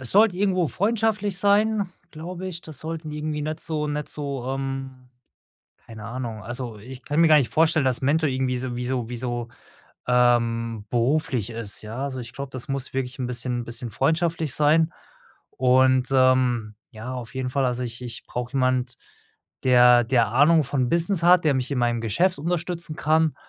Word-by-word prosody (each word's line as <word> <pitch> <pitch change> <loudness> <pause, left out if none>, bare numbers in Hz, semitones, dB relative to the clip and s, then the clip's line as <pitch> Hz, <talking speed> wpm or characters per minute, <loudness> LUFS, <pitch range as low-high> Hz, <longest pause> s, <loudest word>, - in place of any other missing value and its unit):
Es 130 - -1
sollte 205 -2 +5
irgendwo 185 -4 +1
freundschaftlich 210 - 0
sein, 205 -1 +2 0.2
glaube 175 +4 -7
ich. 170 -2 -6
Das 155 -5 -10
sollten 160 -1 -6
irgendwie 150 0 -3
nicht 155 +1 -4
so 155 -2 -2
nicht 150 0 -3
so, 140 -4 -5
ähm 135 -1 -5 0.8
keine 110 -2 -10
Ahnung. 115 -2 -5
Also, 120 -1 -6
ich 125 +4 -10
kann 150 +2 -1
mir 165 - +6
gar 155 - +7
nicht 140 -5 +3
vorstellen, 160 -1 +3
dass 130 -2 +1
Mentor 150 +3 +2
irgendwie 130 -1 -1
so 125 -1 -4
wie 125 - -3
so 125 -2 -2
wie 120 - -5
so, 120 -1 -4 0.6
ähm 115 -3 +2
beruflich 125 -2 0
ist, 115 -3 -6
ja. 110 +3 -7
Also, 130 -2 -4
ich 120 0 -8
glaube, 140 0 -7
das 130 +3 -7
muss 135 -1 -4
wirklich 130 -1 -3
'n 130 - -2
bisschen 120 0 -3
'n - - -9
bisschen 115 +1 -7
freundschaftlich 160 - 0
sein. 155 +2 +3 0.6
Und, 130 0 +3
ähm, 130 -4 +3 0.2
ja, 115 +1 -7
auf 125 0 -7
jeden 130 -1 -2
Fall, 135 +1 0
also 125 0 -2
ich 120 0 -5
ich 120 -2 -7
brauche 125 0 -5
jemand, 130 -2 0 0.7
der 125 -1 +6
der 115 -2 +2
Ahnung 145 +6 +4
von 130 -2 -1
Business 170 +1 +1
hat, 175 0 +5
der 150 - +3
mich 130 0 -2
in 140 - -1
meinem 120 -1 +1
Geschäft 170 - +1
unterstützen 170 0 -3
kann 160 0 +2
130 Hz, 185 wpm, -24 LUFS, 125-155 Hz, 0.8 s, gar